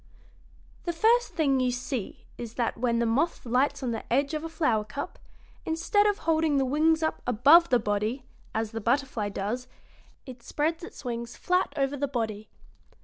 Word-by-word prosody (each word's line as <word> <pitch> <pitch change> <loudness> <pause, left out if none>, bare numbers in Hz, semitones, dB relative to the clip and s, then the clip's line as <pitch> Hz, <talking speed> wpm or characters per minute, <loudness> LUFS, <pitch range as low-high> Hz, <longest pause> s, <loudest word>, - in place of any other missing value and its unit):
"The 345 - -1
first 460 +8 +3
thing 280 -5 +2
you 255 -1 +2
see 250 -3 -4
is 235 -1 -8
that 235 -2 0
when 235 0 0
the 235 - +1
moth 260 +9 0
lights 270 +4 +1
on 245 - -1
the 225 - -6
edge 280 +4 +2
of 310 0 -2
a 330 - -4
flower 295 -10 +1
cup, 215 +7 -6 0.4
instead 410 +6 +2
of 410 -1 +1
holding 320 -2 +2
the 270 - +2
wings 315 +4 +2
up 315 - -1
above 285 +9 +6
the 250 - +5
body, 215 +4 -2 0.3
as 220 -1 -2
the 225 -1 -4
butterfly 240 -2 0
does, 215 +6 -3 0.6
it 255 -2 -10
spreads 315 +7 -2
its 335 - -10
wings 235 0 -4
flat 360 -2 +1
over 275 0 +1
the 285 0 -1
body. 220 -5 -3
260 Hz, 180 wpm, -27 LUFS, 235-315 Hz, 0.6 s, above